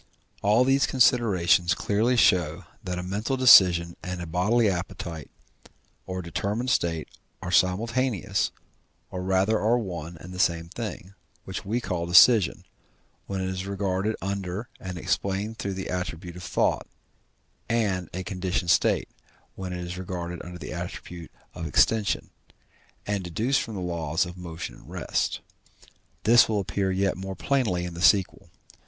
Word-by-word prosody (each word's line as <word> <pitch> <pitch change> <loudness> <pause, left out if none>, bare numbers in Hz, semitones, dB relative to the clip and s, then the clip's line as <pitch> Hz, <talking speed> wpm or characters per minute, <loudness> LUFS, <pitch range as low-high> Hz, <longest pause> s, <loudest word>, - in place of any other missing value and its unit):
All 105 +5 +4
these 135 +1 +3
considerations 95 -8 +3
clearly 110 +7 +1
show 90 -6 +3 0.2
that 90 -2 -4
a 90 - -3
mental 105 +8 -2
decision 90 -9 +7
and 90 0 -5
a 85 - -5
bodily 105 +8 +2
appetite, 85 -3 -4 0.8
or 95 0 -4
determined 105 +9 -2
state, 80 -6 0 0.3
are 90 -1 -5
simultaneous, 100 +1 +1 0.6
or 90 - -4
rather 95 +4 +2
are 115 +3 +3
one 85 -6 -5
and 90 +5 -10
the 90 - -7
same 85 -2 +1
thing, 100 -3 -6 0.3
which - - -6
we 110 +5 0
call 85 -7 -3
decision, 100 +4 +6 0.6
when 95 -1 -3
it 95 - -2
is 95 +1 -4
regarded 100 +1 -1
under 100 +2 -4
and 90 -2 -6
explained 100 +5 -2
through 100 -1 -3
the 95 - -5
attribute 90 -1 -4
of 90 - -9
thought, 90 - 0 0.8
and 100 -7 0
a 95 +2 -5
conditioned 90 -2 -1
state, - - +2 0.5
when 95 -1 -6
it 90 0 -4
is 90 +1 -6
regarded 85 -2 -5
under 90 0 -8
the - - -7
attribute 85 -1 -7 0.2
of 80 - -5
extension, 105 +7 +2 0.7
and 100 -2 -2
deduced 115 +10 0
from 110 - -6
the 95 - -4
laws 85 -1 -1
of 90 0 -8
motion 85 -2 -7
and - - -16
rest. - - -2 0.8
This 115 +2 +6
will 105 -2 +1
appear 95 0 -1
yet 95 0 0
more 95 0 -5
plainly 110 -11 0
in 90 - -6
the 85 - -7
sequel. 95 0 +3
95 Hz, 150 wpm, -26 LUFS, 90-105 Hz, 0.8 s, decision